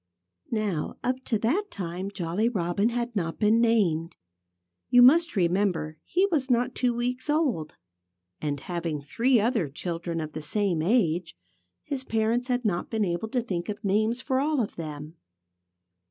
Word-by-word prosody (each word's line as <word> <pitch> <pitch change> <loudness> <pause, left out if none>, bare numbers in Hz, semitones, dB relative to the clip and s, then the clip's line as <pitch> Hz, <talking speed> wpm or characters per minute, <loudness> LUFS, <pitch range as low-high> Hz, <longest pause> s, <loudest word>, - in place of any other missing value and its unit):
Now, 210 -8 -2
up 255 +1 -1
to 225 - +1
that 275 - +1
time 185 - -4
Jolly 195 +3 -1
Robin 200 0 0
had 240 0 -3
not 165 -4 -2
been 220 +2 +3
named. 185 -9 +2 0.7
You 245 0 +7
must 330 +7 +6
remember 180 -3 +1
that - - -33
he 370 +3 +2
was 280 -5 0
not 245 0 +2
two 250 -1 +1
weeks 250 +3 -2
old. 280 - 0 0.7
And 145 -2 -2
having 170 -4 -3
three 235 - +2
other 215 - +1
children 170 +3 -4
of 155 -1 -5
the 155 - -5
same 175 +2 0
age, 175 - +1 0.5
his 270 -2 -4
parents 225 +2 0
had 250 -2 -1
not 180 -4 0
been 220 -2 0
able 175 +4 -2
to 245 +2 -1
think 180 -6 -3
of 210 +2 -5
names 215 +5 +1
for 260 0 0
all 295 +1 +1
of 220 - -2
them. 155 0 -7
210 Hz, 165 wpm, -27 LUFS, 170-245 Hz, 0.7 s, You